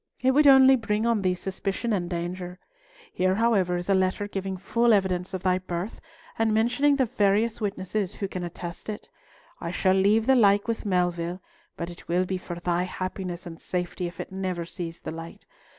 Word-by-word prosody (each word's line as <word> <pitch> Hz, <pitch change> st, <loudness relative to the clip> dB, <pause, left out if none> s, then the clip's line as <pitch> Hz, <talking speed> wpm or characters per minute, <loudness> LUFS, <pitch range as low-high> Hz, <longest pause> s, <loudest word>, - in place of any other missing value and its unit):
It 260 Hz, -, +3 dB
would 290 Hz, +2 st, +5 dB
only 265 Hz, -1 st, +8 dB
bring 220 Hz, -2 st, -1 dB
on 230 Hz, -3 st, +2 dB
thee 185 Hz, -1 st, +1 dB
suspicion 195 Hz, +5 st, -3 dB
and 175 Hz, -4 st, -1 dB
danger. 180 Hz, +1 st, -4 dB, 0.6 s
Here, 185 Hz, +1 st, +2 dB
however, 200 Hz, -5 st, +2 dB
is 175 Hz, -, -5 dB
a 200 Hz, -, +3 dB
letter 190 Hz, +2 st, +1 dB
giving 195 Hz, -1 st, -4 dB
full 230 Hz, +5 st, +2 dB
evidence 185 Hz, -2 st, 0 dB
of 185 Hz, -, -5 dB
thy 185 Hz, 0 st, +2 dB
birth, 180 Hz, +3 st, -5 dB, 0.4 s
and 225 Hz, -1 st, +3 dB
mentioning 245 Hz, +7 st, +3 dB
the 265 Hz, -2 st, +2 dB
various 215 Hz, +2 st, +1 dB
witnesses 195 Hz, -1 st, -2 dB
who 200 Hz, -, -3 dB
can 185 Hz, -1 st, -5 dB
attest 175 Hz, +2 st, -7 dB
it. 210 Hz, -, -7 dB, 0.5 s
I 170 Hz, -, -4 dB
shall 185 Hz, +2 st, +2 dB
leave 205 Hz, +4 st, +3 dB
the 265 Hz, +1 st, +5 dB
like 205 Hz, -3 st, +4 dB
with 230 Hz, -2 st, -2 dB
Melville, 175 Hz, -1 st, 0 dB, 0.4 s
but 170 Hz, 0 st, -4 dB
it 170 Hz, -, -13 dB
will 180 Hz, +2 st, +1 dB
be 185 Hz, 0 st, -3 dB
for 175 Hz, -1 st, -6 dB
thy 175 Hz, 0 st, 0 dB
happiness 185 Hz, -1 st, -4 dB
and 165 Hz, -2 st, -9 dB
safety 180 Hz, 0 st, -3 dB
if 170 Hz, -1 st, -10 dB
it -, -, -6 dB
never 185 Hz, -3 st, -3 dB
see 170 Hz, 0 st, -5 dB
the 165 Hz, -, -8 dB
light. 165 Hz, +1 st, -9 dB
190 Hz, 195 wpm, -26 LUFS, 180-215 Hz, 0.6 s, only